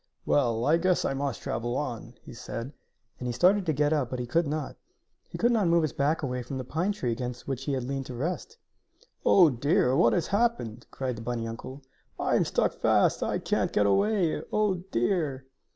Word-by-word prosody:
"Well, 120 -4 +2
I 155 +3 +4
guess 180 +1 +1
I - - 0
must 135 -3 -3
travel 120 +2 -2
on," 120 -4 -5
he - - -11
said, 120 +2 -6 0.5
and 125 - -4
he - - -1
started 185 - +3
to - - +3
get 150 +1 +1
up, 140 -6 0
but 130 - -4
he 125 - -3
could 165 +6 +1
not. 155 +1 -3 0.5
He - - -6
could 240 +1 +3
not 215 -6 +2
move 170 0 +4
his 155 - -1
back 150 +3 0
away 125 -2 -2
from 130 +3 -6
the 130 - -4
pine 165 +10 -1
tree 130 - -2
against 125 +1 -5
which 135 -1 -3
he 145 - -1
had 130 -2 -1
leaned 135 +1 -4
to 125 - -7
rest. 180 - -4 0.7
"Oh, 175 -6 +6
dear! 135 - +2
what 115 -3 +4
has 170 - +1
happened," 200 - -1
cried 130 -3 -4
the - - -7
bunny 115 -1 -3
uncle. 130 +4 -8 0.4
"I - - +1
am - - +3
stuck - - +1
fast! - - +2
I - - 0
can't - - 0
get 105 - +2
away! 180 - +2
Oh, 210 -2 +2 0.2
dear!" 135 +1 0
135 Hz, 215 wpm, -28 LUFS, 120-170 Hz, 0.7 s, Oh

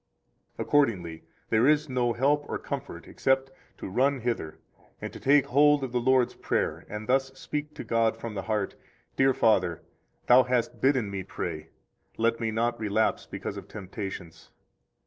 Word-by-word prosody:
110 - - -4
Accordingly, 95 - +1 0.3
there 115 +3 +4
is 150 0 +3
no 125 -2 0
help 145 +5 +2
or - - -2
comfort - - -6
except 135 0 0 0.3
to - - -6
run 130 +7 +1
hither 115 -10 -3 0.4
and - - -6
to - - -9
take 140 0 +4
hold 145 +2 +4
of 130 - -3
the 125 - +1
Lord's 130 0 +3
Prayer, - - -2
and 105 0 -5
thus 135 +2 +1
speak 150 0 -5
to - - -6
God 115 -1 +1
from 115 -1 -6
the 100 - -3
heart: 100 0 -2 0.4
Dear 135 -1 +3
Father, 95 -7 +2 0.4
Thou 125 +1 +7
hast 125 -2 -1
bidden 130 -7 +2
me 100 -1 -3
pray; 85 -4 -5 0.5
let 115 +1 +1
me 115 -1 -1
not 115 +2 -1
relapse 110 0 0
because - - -6
of - - -8
temptations. 95 -4 -7
120 Hz, 165 wpm, -27 LUFS, 105-135 Hz, 0.5 s, Thou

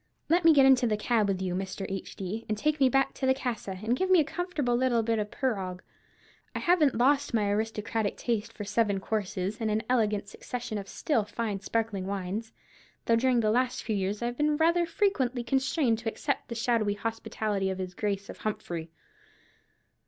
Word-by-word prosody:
Let 345 +2 +4
me 330 - +8
get 280 -3 +6
into 260 -2 +5
the 215 -2 +1
cab 215 -1 +1
with 190 -1 -1
you, 180 -1 -1
Mr. 190 +1 -4
H.D., 195 +2 -5
and 215 - 0
take 300 +6 0
me 265 -2 +5
back 270 +1 +2
to 265 - -2
the 260 - +4
casa, 235 -7 -4
and 230 +3 +1
give 375 +8 -1
me 370 -2 +6
a - - +5
comfortable 310 -6 -1
little 240 -2 +2
bit 225 0 +1
of 210 0 -2
perrogg. 190 -9 -2 0.7
I - - 0
haven't 335 -6 +3
lost 275 +1 +3
my 215 -2 +2
aristocratic 220 0 -1
taste 230 -2 -2
for 215 - -7
seven 205 -1 +1
courses, 205 +1 -3
and 220 - 0
an 215 +1 0
elegant 215 -5 +1
succession 240 -2 -5
of 195 - -8
still 235 +2 0
fine 210 -1 -3
sparkling 210 -2 -2
wines, 200 +3 -3 0.5
though 230 - +4
during 245 0 +3
the 215 -1 +2
last 250 +2 +1
few 220 - -1
years 200 +3 -2
I've 240 0 -2
been 295 0 +2
rather 340 +2 +3
frequently 270 - 0
constrained 265 -1 +1
to 225 -1 -2
accept 280 +4 -3
the 235 - -5
shadowy 225 -3 +1
hospitality 215 -2 -2
of 190 - -3
his 185 -1 -5
grace 200 0 -2
of - - -9
Humphrey. 170 -6 -4
225 Hz, 195 wpm, -29 LUFS, 205-260 Hz, 0.7 s, me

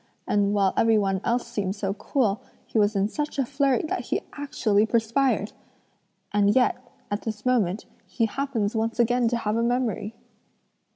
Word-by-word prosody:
and 205 -1 +2
while 195 -2 +2
every 225 -1 +4
one 195 -2 0
else 240 +1 0
seemed 205 -5 -3
so 195 -2 -2
cool, 215 -1 0 0.2
he 225 - -1
was 205 0 +2
in 195 0 +2
such 295 +7 -4
a 270 - +1
flurry 275 -1 +1
that 310 - -3
he - - -1
actually 225 -7 +1
perspired! 230 0 +1 0.8
And 205 0 +3
yet, 255 -1 +4 0.4
at 205 - -1
this 215 -1 -5
moment, 215 -6 +1 0.2
he 230 - 0
happens 230 -3 -2
once 225 +2 -1
again 240 +1 +3
to 240 +1 +1
have 215 -2 -1
a - - +1
memory!" 235 -3 -1
225 Hz, 170 wpm, -25 LUFS, 205-245 Hz, 0.8 s, every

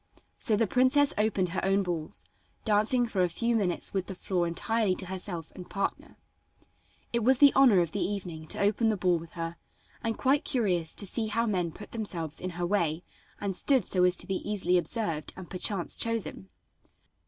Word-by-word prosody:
So 220 - +2
the 225 +2 +2
princess 260 +6 +3
opened 205 -4 +1
her 185 - -3
own 195 +1 +2
balls, 170 -4 -5 0.4
dancing 220 +3 +3
for 205 -5 -1
a 180 - +2
few 235 +7 0
minutes 190 -6 -1
with 190 -2 -2
the 190 - -3
floor 180 -1 -1
entirely 210 +3 0
to 185 - -2
herself 180 -3 -4
and 180 -2 -10
partner. 200 -1 -3 1.0
It 235 -1 +1
was 260 +3 +5
the 285 +1 +7
honor 245 -9 +6
of 170 -2 -2
the 205 - -3
evening 180 -6 -4
to - - -4
open 210 +3 +2
the 215 - 0
ball 180 -2 +2
with 165 0 -12
her, 165 0 -5 0.5
and 225 -1 -1
quite 275 +3 +2
curious 185 - 0
to 205 - +1
see 220 +3 -1
how 230 +2 0
men 180 -6 -1
put 205 +6 -11
themselves 170 -9 -3
in 185 - -3
her 175 - -1
way 175 -3 0 0.4
and 200 -2 -3
stood 260 0 +2
so 180 -2 +2
as 180 0 +3
to - - -4
be 195 -1 -1
easily 185 -4 +1
observed 170 -6 -3
and 185 -3 -10
perchance 185 -1 0
chosen. 230 -4 -2
195 Hz, 195 wpm, -29 LUFS, 175-225 Hz, 1.0 s, the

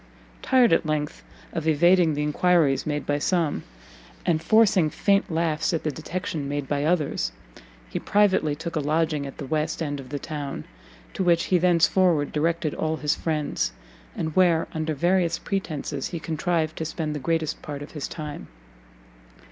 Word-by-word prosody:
Tired, 255 -6 +4
at - - +3
length, 155 -2 -2 0.3
of 165 -2 -3
evading 170 +1 +4
the 150 - -1
enquiries 150 -2 +2
made 150 -1 -2
by 145 0 0
some, 165 -1 0 0.6
and 160 -3 +2
forcing 200 -4 +4
faint 200 +5 +1
laughs 160 0 0
at 160 - -3
the 155 - 0
detection 155 -2 -4
made 145 -1 -3
by 145 0 -1
others, 150 - 0 0.6
he - - -4
privately 190 -7 +2
took 165 +2 -6
a - - +1
lodging 155 -1 0
at 135 - -10
the 145 - -6
west 155 +3 -1
end 145 -3 -3
of 130 -2 -10
the 145 - -3
town, 145 -2 -5 0.5
to - - -1
which 170 -2 +3
he 180 - +6
thence 170 -2 +4
forward 175 -6 +2
directed 160 0 0
all 160 0 -1
his 150 +1 +1
friends, 155 -3 -1 0.4
and 160 -1 -3
where, 175 -3 +4
under 155 -1 -2
various 175 +2 +2
pretences, 155 -8 -3
he 170 - -5
contrived 160 0 -1
to - - -2
spend 155 -1 -3
the 150 - -4
greatest 160 +2 -1
part 145 -1 -6
of 145 - -11
his 150 -3 -4
time. 150 -2 -7
160 Hz, 170 wpm, -25 LUFS, 150-170 Hz, 0.6 s, he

